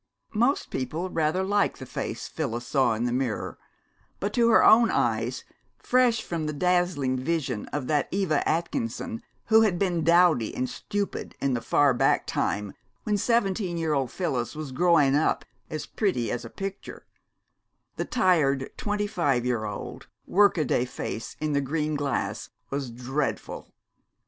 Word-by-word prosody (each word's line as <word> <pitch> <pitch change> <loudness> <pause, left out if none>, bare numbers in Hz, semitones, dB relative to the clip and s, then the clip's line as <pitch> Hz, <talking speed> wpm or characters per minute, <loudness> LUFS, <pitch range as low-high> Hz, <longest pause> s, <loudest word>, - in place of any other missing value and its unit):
Most 240 +6 +1
people 160 +8 -3
rather 160 +3 +1
liked 205 +1 +1
the - - -8
face - - -5
Phyllis 120 -6 -4
saw 130 -5 +2
in 110 - -2
the 120 - 0
mirror; 125 -4 -2 0.6
but 200 +1 -2
to 235 -1 +4
her 225 - +6
own 230 +1 +7
eyes, - - 0 0.3
fresh 245 -3 +2
from 165 -3 -3
the 150 - -2
dazzling 175 -6 +1
vision 135 -6 -2
of 145 -3 -4
that 150 +1 +1
Eva 185 -6 +1
Atkinson 115 -9 -2 0.2
who 220 0 +6
had 205 -5 +2
been 175 -3 0
dowdy 170 -8 +4
and 130 - -1
stupid 200 +9 -4
in 140 -1 0
the 120 - -1
far 145 +2 +3
back 120 - +2
time 105 -1 -2 0.3
when 210 - 0
seventeen 195 -4 +1
year 160 -2 0
old 135 -3 0
Phyllis 125 -9 -2
was 150 -3 -6
"growin' 155 -2 +4
up 150 +2 +1 0.2
as 155 - -4
pretty 180 - -1
as 120 - -3
a 115 - -8
picture," 195 - -7 0.9
the - - 0
tired, 150 - +2
twenty 205 0 -1
five 145 - 0
year 120 -3 0
old, 105 -2 -7 0.2
workaday 175 -11 +3
face 120 -2 -6
in 155 -1 -1
the 140 - +2
green 150 +2 -1
glass 140 -3 -2 0.2
was 140 -2 -2
dreadful. 125 +5 -4
155 Hz, 155 wpm, -26 LUFS, 130-190 Hz, 0.9 s, own